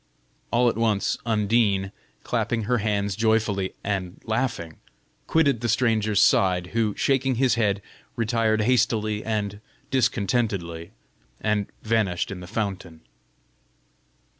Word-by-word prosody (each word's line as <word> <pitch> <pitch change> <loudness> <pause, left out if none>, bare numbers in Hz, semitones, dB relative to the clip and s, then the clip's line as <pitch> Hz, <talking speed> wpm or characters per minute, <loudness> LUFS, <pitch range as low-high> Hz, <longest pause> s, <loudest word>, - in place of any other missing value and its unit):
All 120 +1 +3
at 115 - +1
once 110 -3 +1
Undine, 105 -3 +2 0.3
clapping 115 -2 -1
her 120 +3 +1
hands 100 -2 -1
joyfully, 110 -3 +1
and 95 -3 -3
laughing, 110 - -2 0.5
quitted 140 -7 +2
the 120 - -1
stranger's 110 -3 +2
side, 90 -2 +3
who, 110 -3 +1
shaking 135 -1 +1
his 125 0 +3
head, 105 -4 0 0.3
retired 110 -1 +1
hastily 110 -3 +1
and 105 -2 -2 0.3
discontentedly, 100 -8 0 0.5
and 105 -2 0 0.2
vanished 105 -6 0
in 95 - -6
the 90 - -9
fountain. 95 -6 -4
110 Hz, 115 wpm, -25 LUFS, 100-115 Hz, 0.5 s, All